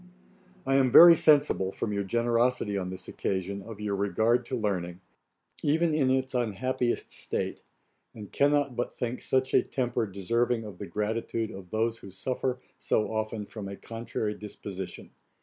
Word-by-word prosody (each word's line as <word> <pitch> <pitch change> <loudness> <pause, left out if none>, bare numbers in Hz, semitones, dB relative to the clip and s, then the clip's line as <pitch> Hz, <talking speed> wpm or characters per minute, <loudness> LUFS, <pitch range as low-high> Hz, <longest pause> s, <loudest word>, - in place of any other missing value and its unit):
I 135 0 +3
am 130 -2 +3
very 170 +5 +11
sensible, 145 - +3
from 105 +1 -3
your 100 - 0
generosity 115 +1 +1
on 95 -2 -2
this 95 0 -7
occasion, 95 +1 -3
of 110 +1 -10
your 105 -1 -2
regard 110 +5 +1
to 130 - -2
learning, 90 -5 -2 0.6
even 160 +2 +2
in 140 -4 +2
its 130 0 0
unhappiest 120 +1 -1
state; - - -4 0.5
and 105 -3 -9
cannot 145 -2 +2
but 120 - -3
think 125 0 -3
such 130 0 0
a - - +6
temper 120 -3 -1
deserving 115 +5 0
of 100 -4 -10
the - - -6
gratitude 110 +4 -2
of 95 -2 -10
those 115 +2 -1
who 100 - -11
suffer 125 +6 -2 0.2
so 110 +1 0
often 110 -1 -2
from 105 -1 -7
a 100 - -6
contrary 115 -1 -4
disposition. 100 -3 -8
115 Hz, 160 wpm, -28 LUFS, 100-125 Hz, 0.6 s, very